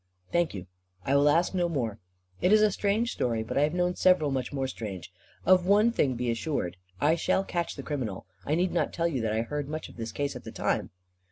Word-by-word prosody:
"Thank 170 -8 +1
you. 90 -2 -6 0.4
I 135 - +2
will 145 +1 +5
ask 170 +5 +2
no 175 -2 +1
more. 115 -9 -2 0.4
It 180 - +3
is 215 0 +6
a 210 - +4
strange 210 +4 0
story; 115 -3 -1
but 110 - -5
I 140 - +3
have 150 +3 +1
known 180 0 +1
several 180 -6 +4
much 130 -2 -2
more 135 -2 -1
strange. 100 -9 -6 0.3
Of 185 0 +5
one 210 +4 +5
thing 135 - +1
be 120 0 -1
assured. 115 - -2 0.2
I 150 +2 +4
shall 170 +3 +1
catch 175 -3 -2
the - - -7
criminal. 125 -10 -4 0.2
I 150 - 0
need 180 +2 +1
not 175 - 0
tell 170 0 +1
you 140 -7 -1
that 110 -1 0
I 110 +1 0
heard 145 +3 -4
much 155 +1 -5
of - - -15
this 115 -1 -4
case 145 0 -2
at - - -8
the - - -8
time." - - -1
150 Hz, 240 wpm, -28 LUFS, 120-180 Hz, 0.4 s, is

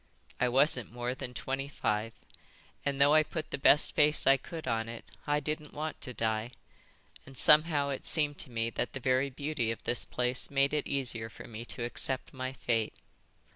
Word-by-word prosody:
I 125 - +2
wasn't 130 -2 +2
more 120 +1 -3
than 130 -1 -8
twenty 135 +1 -3
five, 110 -5 -2 0.7
and 140 -1 -2
though 140 +1 +6
I 155 - +7
put 155 0 -5
the - - -3
best 150 +2 +5
face 150 +1 +3
I 135 - +7
could 160 +3 -7
on 115 -2 -1
it, 115 0 -8 0.2
I 145 0 +2
didn't 150 0 -5
want 155 +1 -4
to 125 - -5
die. 110 +1 -2 0.7
And 135 -1 -12
somehow 150 -1 +5
it 135 - -4
seemed 145 -3 +2
to - - -7
me 115 -1 -2
that - - -3
the 135 - -5
very 130 +2 +1
beauty 140 -3 -2
of 115 - -4
this 120 - +3
place 125 0 -1
made 140 +1 +2
it 150 -2 0
easier 120 -5 -1
for - - -11
me 115 0 -8
to 120 - -6
accept 130 +3 -1
my 130 -1 -4
fate. 115 - -1
130 Hz, 195 wpm, -31 LUFS, 120-145 Hz, 0.7 s, I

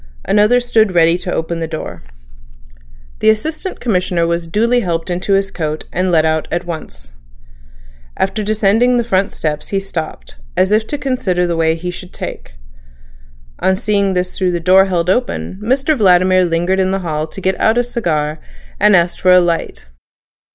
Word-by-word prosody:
Another 210 +4 +3
stood 220 -5 +1
ready 165 0 +4
to 180 - -5
open 165 0 -3
the 165 - -3
door. 155 -1 -6 1.2
The 220 - +3
Assistant 310 - -2
Commissioner 180 -6 0
was 170 0 -2
duly 230 +7 +2
helped 170 -4 -2
into 180 +3 -1
his 195 0 +1
coat, 155 -2 -4
and 185 +1 0
let 160 -2 +3
out 160 0 0
at 175 +1 -2
once. 65 - -8 1.1
After 195 +3 -1
descending 215 +4 +2
the 240 - +1
front 195 -3 0
steps 150 -1 -3
he 195 - -1
stopped, 160 - -6 0.2
as 190 +2 +2
if 215 +1 +2
to 290 - -3
consider 245 -10 -1
the 170 -1 -1
way 160 0 +1
he 180 +2 -5
should 180 +1 -10
take. - - -7 1.0
On 190 - +2
seeing 200 -2 0
this 180 0 -2
through 185 -2 0
the 175 - -1
door 185 +3 +5
held 175 -3 -1
open, 190 - -1
Mr 270 +6 +1
Vladimir 185 -4 +4
lingered 175 +3 0
in 190 0 +2
the 195 0 -1
hall 155 -1 -2
to 175 - -9
get 190 0 -1
out 220 +2 +3
a 245 - +3
cigar 155 -11 -2 0.4
and 210 0 +5
asked 175 0 +1
for 185 - +4
a 180 - +7
light. 170 - -2
185 Hz, 180 wpm, -16 LUFS, 170-210 Hz, 1.2 s, a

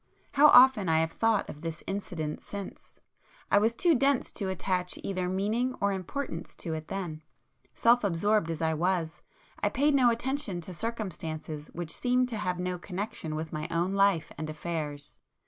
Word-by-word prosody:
How 290 +1 +7
often 250 - +7
I 160 - +4
have 160 0 0
thought 225 0 +1
of 150 - -9
this 165 -1 -5
incident 170 -6 -4
since! 200 -2 -9 0.5
I 205 - +6
was 225 +3 +2
too 340 +6 +4
dense 275 -1 +2
to 195 -4 -3
attach 185 -1 -1
either 185 -2 -2
meaning 220 +7 0
or 200 0 +2
importance 190 - -4
to 165 - -5
it 155 0 -5
then,—self 195 +7 -1
absorbed 200 0 +2
as 165 -1 -3
I 160 0 +2
was, 170 0 -1 0.4
I - - +1
paid 290 +2 +2
no 260 -3 +5
attention 235 -4 -1
to 180 +2 -8
circumstances 160 -8 -5
which 170 -1 -4
seemed 250 0 +2
to 230 - -3
have 180 -4 -1
no 180 0 -2
connection 180 -4 -4
with 160 +1 -5
my 155 0 -3
own 170 +3 0
life 195 -4 +2
and 155 0 -4
affairs. 150 -2 -5
185 Hz, 170 wpm, -29 LUFS, 160-225 Hz, 0.5 s, How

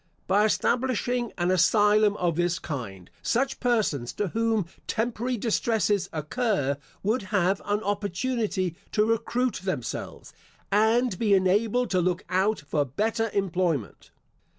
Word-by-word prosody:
By 205 +3 +3
establishing 245 +1 0
an 175 +1 +1
asylum 210 +2 +4
of 175 -3 0
this 175 0 +1
kind, 100 - -6
such 265 +3 0
persons 215 - 0
to 205 -2 -2
whom 225 -1 0 0.2
temporary 240 +2 -1
distresses 210 -3 0
occur, 155 - -1 0.3
would 220 +6 +1
have 195 -1 +1
an 205 +1 -1
opportunity 205 -2 -1 0.2
to 210 - +3
recruit 235 +2 0
themselves, 170 -11 -5 0.4
and 220 +1 +2
be 210 -3 +4
enabled 210 +6 +2
to 185 -1 +2
look 180 +2 0
out 190 +2 +1
for 145 +1 0
better 220 - -1
employment. 180 - -1
205 Hz, 125 wpm, -26 LUFS, 180-225 Hz, 0.4 s, asylum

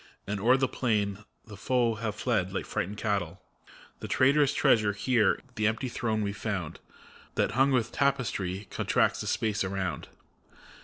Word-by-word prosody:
And 100 0 -3
o'er 125 +6 +4
the 135 0 +1
plain 105 -6 -1 0.3
the 105 - -10
foe 120 +2 +1
have 110 -1 -4
fled 110 -5 0
like 95 - -3
frightened 100 +4 -3
cattle. 100 -4 -2 0.6
The - - -6
trait'rous 140 +2 +4
treasure, 105 -6 +3
here, 110 -1 +2
the 110 -3 +1
empty 115 +4 -1
throne, 110 -3 -1
we've 100 0 -3
found. 95 -8 -4 0.6
That, - - +1
hung 135 +2 +3
with 120 -3 +1
tapestry, 110 -8 -1
contracts - - +1
the - - -5
space 105 -2 0
around. 95 -5 -3
110 Hz, 155 wpm, -28 LUFS, 100-125 Hz, 0.6 s, o'er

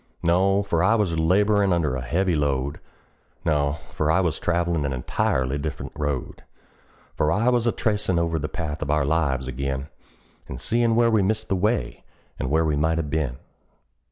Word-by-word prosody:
No 95 +4 +3
for 85 -5 0
I 105 +6 +4
was 90 -7 0
laborin' 100 +4 +3
under 80 -6 +1
a 65 - -3
heavy 85 +9 0
load; 70 -2 -1 0.7
No 75 -3 +1 0.2
for 75 - 0
I 80 - +4
was 85 -5 0
travelin' 85 -2 0
an 70 -1 -1
entirely 65 +2 -1
different 75 0 -5
road; 70 -4 -3 0.7
For 75 - +1
I 110 +7 +2
was 120 -1 +2
a - - +4
tracin' 105 -6 0
over 85 -1 0
the 75 +1 -3
path 80 -2 -4
of 75 - -3
our 75 0 +2
lives 70 -3 0
ag'in, 70 +2 -3 0.6
And 65 - -7
seein' 115 - +1
where 115 0 +4
we 110 -2 +3
missed 110 +3 -1
the 95 - +2
way, 90 - -1 0.4
and 65 - -2
where 80 +2 +2
we 75 -1 +1
might 80 +2 +1
have 75 -3 -3
been. 75 -6 -1
80 Hz, 185 wpm, -24 LUFS, 70-95 Hz, 0.7 s, I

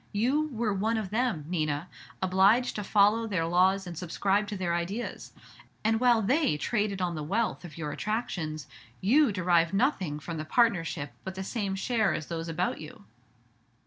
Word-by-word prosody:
You 260 +9 +1
were 235 -6 -1
'one 220 +4 0
of 205 -4 -4
them,' 220 - 0
Nina, 155 -1 -1 0.4
obliged 195 +7 +3
to 210 - -3
follow 210 +3 +3
their 185 -6 0
laws 185 +3 +3
and 175 -1 -7
subscribe 195 +4 0
to 205 -1 -4
their 175 -2 -1
ideas; 185 +8 -4 0.5
and 220 +1 +2
while 240 -3 +4
they 260 - +2
traded 205 +1 -1
on 175 -1 -1
the 155 - -4
wealth 210 +10 -1
of 175 -2 -10
your 150 -2 -4
attractions, 170 - -3 0.3
you 255 +6 +4
derived 175 -2 +2
nothing 195 - 0
from 165 +2 -6
the 155 - -3
partnership 165 - +1
but 190 0 -6
the 190 - -4
same 200 -2 -2
share 215 -1 +1
as 155 - -4
those 165 -1 -4
about 165 +1 -1
you." 150 -10 -11
195 Hz, 175 wpm, -28 LUFS, 170-220 Hz, 0.5 s, while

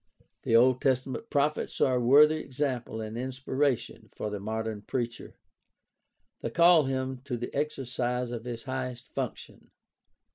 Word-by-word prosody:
The 115 - +1
Old 125 +2 +5
Testament 130 - 0
prophets 145 +1 0
are 130 -1 +3
a 125 - 0
worthy 150 +5 +6
example 130 -6 -3
and 110 0 -6
inspiration 130 -2 -2
for 105 - -5
the 105 - -4
modern 110 +1 -3
preacher. 120 +2 -4 1.1
They - - -2
call 170 -2 +6
him 130 -1 -2
to 125 -4 -3
the 120 - -6
exercise 125 -4 -2
of 120 -1 -5
his 120 -2 -5
highest 130 -2 -5
function. - - -6
130 Hz, 140 wpm, -29 LUFS, 120-135 Hz, 1.1 s, worthy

